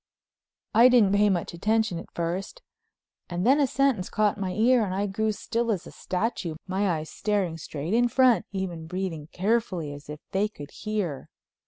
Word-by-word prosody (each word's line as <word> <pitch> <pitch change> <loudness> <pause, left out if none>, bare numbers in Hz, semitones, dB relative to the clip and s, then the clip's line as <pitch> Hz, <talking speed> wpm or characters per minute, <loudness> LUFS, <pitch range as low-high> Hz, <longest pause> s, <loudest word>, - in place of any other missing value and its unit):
I 235 +3 +7
didn't 235 -6 +5
pay 205 +1 +4
much 175 -3 -1
attention 215 0 +1
at - - -10
first 180 - -4 0.7
and 175 +2 -2
then 270 +4 +5
a 280 - +4
sentence 260 -8 +1
caught 210 -1 +1
my 190 -2 -2
ear 235 +3 +4
and 185 -3 -2
I 200 +1 0
grew 215 +2 0
still 230 +2 -1
as 190 -5 -2
a - - -10
statue, 185 -4 -2
my 195 +1 0
eyes 155 0 -7
staring 200 -6 -1
straight 155 +4 -4
in 240 +1 +4
front, 250 -2 +3
even 180 -5 -4
breathing 175 -4 -4
carefully 185 -7 0
as 145 0 -12
if 150 0 -6
they 200 +2 +1
could 145 -9 -11
hear. 205 -10 -3
200 Hz, 180 wpm, -26 LUFS, 175-225 Hz, 0.7 s, I